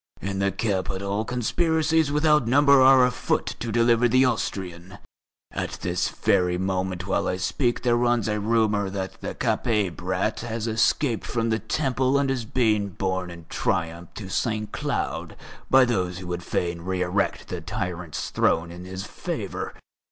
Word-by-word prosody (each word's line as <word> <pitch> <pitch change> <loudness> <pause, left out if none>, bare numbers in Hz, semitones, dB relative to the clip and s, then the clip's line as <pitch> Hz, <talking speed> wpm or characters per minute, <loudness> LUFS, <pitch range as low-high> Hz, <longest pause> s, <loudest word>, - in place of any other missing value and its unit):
In 95 0 -3
the 100 0 +2
capital 100 0 -1
conspiracies 160 +5 +1
without 150 -3 +3
number 140 +2 +6
are 130 -1 +7
afoot 125 0 -1
to 115 - -3
deliver 120 +1 +4
the 130 +3 +4
Austrian. 95 -5 -3 0.5
At - - -3
this 90 0 0
very 90 -1 +1
moment 95 0 -2
while 95 - 0
I 90 - -1
speak 120 +6 0
there 120 -2 +3
runs 120 -2 +2
a 105 -1 0
rumour 105 -2 +1
that 95 -1 -5
the - - -5
Capet 105 -7 0
brat 95 +6 -1
has 115 -1 -4
escaped 115 +2 +1
from 115 -1 -1
the 110 - +1
Temple 130 +2 +1
and 140 -1 +1
is 125 -4 -2
being 110 -4 +1
borne 95 0 -2
in 85 -1 -10
triumph 85 +1 -2
to 100 - -7
Saint 110 +2 -1
Cloud - - -3 0.3
by 130 -1 +7
those 90 -7 -1
who 90 - -7
would 90 0 -3
fain 85 -1 -2
re 90 +1 -1
erect 95 +3 -1
the - - -4
tyrant's 85 -3 -4
throne 85 +1 +1
in 90 +1 -9
his 95 +1 -6
favour. - - -5
105 Hz, 160 wpm, -25 LUFS, 90-120 Hz, 0.5 s, are